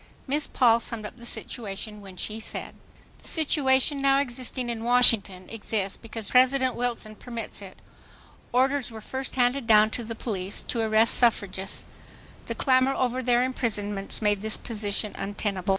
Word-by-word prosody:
Miss 290 Hz, +2 st, +1 dB
Paul 235 Hz, -3 st, +4 dB
summed 225 Hz, -1 st, -5 dB
up 210 Hz, -, -9 dB
the 240 Hz, 0 st, -10 dB
situation 210 Hz, -2 st, -6 dB
when 190 Hz, -2 st, -12 dB
she 215 Hz, +4 st, -3 dB
said: 220 Hz, -, -4 dB, 0.5 s
"The -, -, -11 dB
situation 280 Hz, -3 st, +3 dB
now 275 Hz, 0 st, +4 dB
existing 255 Hz, -1 st, -2 dB
in 230 Hz, -1 st, -4 dB
Washington 230 Hz, -6 st, +4 dB
exists 210 Hz, -3 st, -3 dB
because 225 Hz, -2 st, -7 dB
President 260 Hz, 0 st, +4 dB
Wilson 235 Hz, -3 st, -3 dB
permits 230 Hz, -2 st, -6 dB
it. 195 Hz, -2 st, -11 dB, 0.7 s
Orders 265 Hz, +2 st, +1 dB
were 225 Hz, -1 st, -9 dB
first 260 Hz, +4 st, -6 dB
handed 250 Hz, 0 st, +1 dB
down 215 Hz, -1 st, +6 dB
to 240 Hz, -, -3 dB
the 230 Hz, 0 st, -6 dB
police 195 Hz, -4 st, -4 dB
to 235 Hz, -, -1 dB
arrest 220 Hz, +1 st, +4 dB
suffragists. 195 Hz, -5 st, +1 dB, 0.6 s
The -, -, -3 dB
clamor 260 Hz, 0 st, +3 dB
over 255 Hz, 0 st, 0 dB
their 245 Hz, 0 st, +3 dB
imprisonments 210 Hz, -6 st, -2 dB
made 205 Hz, -1 st, +2 dB
this 220 Hz, 0 st, 0 dB
position 210 Hz, -2 st, -2 dB
untenable. 200 Hz, -2 st, -3 dB
230 Hz, 155 wpm, -26 LUFS, 210-255 Hz, 0.7 s, down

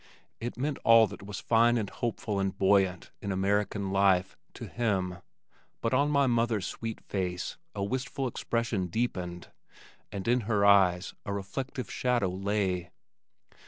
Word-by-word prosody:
It 120 Hz, +1 st, -5 dB
meant 140 Hz, +2 st, -2 dB
all 115 Hz, -1 st, +7 dB
that -, -, -9 dB
was 100 Hz, -1 st, -6 dB
fine 120 Hz, +1 st, +4 dB
and 110 Hz, -3 st, -1 dB
hopeful 110 Hz, -2 st, -3 dB
and 95 Hz, 0 st, -1 dB
buoyant 95 Hz, -2 st, +2 dB
in 100 Hz, -, -3 dB
American 100 Hz, +1 st, 0 dB
life, 95 Hz, -1 st, +3 dB, 0.2 s
to -, -, -7 dB
him 95 Hz, -6 st, -1 dB, 0.6 s
but 115 Hz, -, -1 dB
on 140 Hz, +3 st, +3 dB
my 140 Hz, -1 st, +3 dB
mother's 115 Hz, -5 st, +1 dB
sweet 115 Hz, -1 st, -5 dB
face 90 Hz, -2 st, -3 dB, 0.2 s
a 100 Hz, -, -2 dB
wistful 130 Hz, +4 st, -2 dB
expression 115 Hz, -5 st, -1 dB
deepened 90 Hz, -4 st, -3 dB, 0.6 s
and 100 Hz, +1 st, -5 dB
in 120 Hz, +2 st, +4 dB
her 105 Hz, -2 st, +2 dB
fine 100 Hz, -, +8 dB, 0.2 s
eyes 90 Hz, +1 st, -8 dB
a 100 Hz, -, -4 dB
reflective 100 Hz, +7 st, -4 dB
shadow 120 Hz, -6 st, +1 dB
lay. 95 Hz, -2 st, -1 dB
105 Hz, 150 wpm, -29 LUFS, 95-120 Hz, 0.6 s, fine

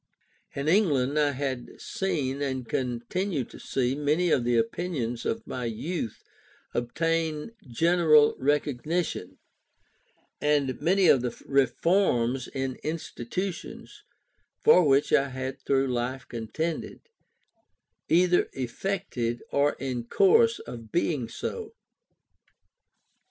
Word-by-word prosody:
In 140 Hz, +1 st, -3 dB
England, 150 Hz, -7 st, +3 dB
I 145 Hz, -1 st, +2 dB
had 130 Hz, -2 st, -4 dB
seen 145 Hz, -8 st, -2 dB
and 130 Hz, -3 st, -2 dB
continued 130 Hz, -, -2 dB
to -, -, -11 dB
see 130 Hz, -1 st, -1 dB
many 150 Hz, +5 st, +1 dB
of 125 Hz, -, +3 dB
the 120 Hz, 0 st, +2 dB
opinions 120 Hz, -1 st, -2 dB
of 225 Hz, -, -2 dB
my 125 Hz, -1 st, -4 dB
youth 115 Hz, -, -4 dB, 0.5 s
obtain 160 Hz, -, -1 dB, 0.2 s
general 155 Hz, +3 st, +4 dB
recognition, 145 Hz, -, -1 dB, 1.0 s
and 145 Hz, -3 st, +1 dB
many 190 Hz, +1 st, +3 dB
of 135 Hz, -, +6 dB
the 120 Hz, -1 st, -4 dB
reforms 135 Hz, -3 st, +2 dB
in 135 Hz, -1 st, -4 dB
institutions, 165 Hz, +3 st, -5 dB, 0.6 s
for 180 Hz, -4 st, +6 dB
which 140 Hz, +1 st, +3 dB
I 140 Hz, -2 st, +4 dB
had 130 Hz, 0 st, -5 dB
through 135 Hz, -1 st, +1 dB
life 125 Hz, +1 st, -2 dB
contended, 120 Hz, +9 st, -4 dB, 1.1 s
either 180 Hz, +1 st, +4 dB
effected 125 Hz, -3 st, -3 dB
or 145 Hz, +1 st, +3 dB
in 125 Hz, -3 st, -4 dB
course 200 Hz, -, +4 dB
of 115 Hz, -2 st, -10 dB
being 150 Hz, -8 st, 0 dB
so. 450 Hz, -1 st, -5 dB
140 Hz, 105 wpm, -27 LUFS, 125-170 Hz, 1.1 s, of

